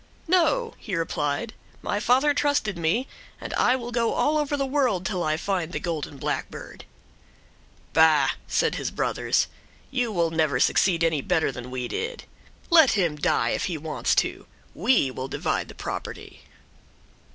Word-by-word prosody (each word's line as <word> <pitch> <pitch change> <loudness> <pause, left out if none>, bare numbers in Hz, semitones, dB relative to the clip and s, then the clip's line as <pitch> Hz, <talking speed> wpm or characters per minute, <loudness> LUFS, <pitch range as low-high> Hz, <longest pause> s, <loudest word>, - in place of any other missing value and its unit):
"No," 370 +7 +2
he 200 - -4
replied, 165 +5 -2 0.3
"my 205 - -1
father 265 +7 +3
trusted 285 -8 +1
me, 170 +11 0 0.3
and - - -6
I 250 - +3
will 240 -2 -5
go 230 -1 +1
all 305 +1 +2
over 290 -1 -1
the 275 - 0
world 260 -10 0
till 185 -4 -1
I 155 -1 0
find 180 -2 -2
the - - -3
golden 155 -4 -4
blackbird." - - -5 1.1
"Bah," 160 -2 +5 0.2
said - - +1
his - - -2
brothers, - - 0 0.5
"you 250 -4 0
will 170 -4 +1
never 160 -3 +1
succeed 170 -3 +3
any 160 -3 +2
better 160 +1 +1
than 125 -1 -8
we 125 -1 -3
did. 470 - -4 0.5
Let 320 -5 +7
him 175 -7 +1
die 150 - +1
if - - -1
he 175 -4 -2
wants 155 +1 -1
to. - - -8 0.3
We 195 - +2
will 130 +1 -5
divide - - -2
the - - -12
property." - - -7
190 Hz, 160 wpm, -25 LUFS, 160-260 Hz, 1.1 s, Let